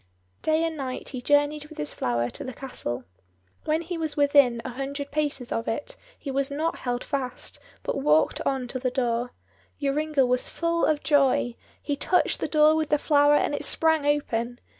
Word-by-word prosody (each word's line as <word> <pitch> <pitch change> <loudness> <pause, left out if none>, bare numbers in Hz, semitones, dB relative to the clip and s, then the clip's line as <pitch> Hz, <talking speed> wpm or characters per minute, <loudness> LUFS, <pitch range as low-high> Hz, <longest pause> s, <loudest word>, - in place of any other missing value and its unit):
Day 315 +1 +2
and 325 -1 -1
night 260 -3 -5
he 255 -3 -5
journeyed 290 +2 +2
with 315 - -13
this 150 - -2
flower 120 0 -1
to - - -7
the 260 - -6
castle. 130 - -4 0.6
When 315 +2 +1
he 340 0 -4
was 315 -2 -3
within 280 -4 +5
a 260 - -3
hundred 280 +3 -5
paces 290 -4 -2
of 230 - -2
it 290 - -3 0.2
he 275 - -6
was 275 +1 0
not 310 +4 -2
held 245 -1 -2
fast, 265 -3 -4 0.2
but 275 - -2
walked 155 - +3
on 265 -2 -1
to 255 - -3
the 255 0 0
door. 245 -1 -1 0.5
Joringel 285 -1 +1
was 250 0 +1
full 335 0 0
of 300 -1 +1
joy; 275 -5 +3 0.3
he 285 - -1
touched 360 +5 +1
the - - -1
door 305 0 +5
with 315 -1 0
the 300 - +4
flower, 290 0 +4
and 295 - +1
it 290 - -2
sprang 320 -2 +2
open. 245 -5 0
285 Hz, 190 wpm, -26 LUFS, 250-300 Hz, 0.6 s, within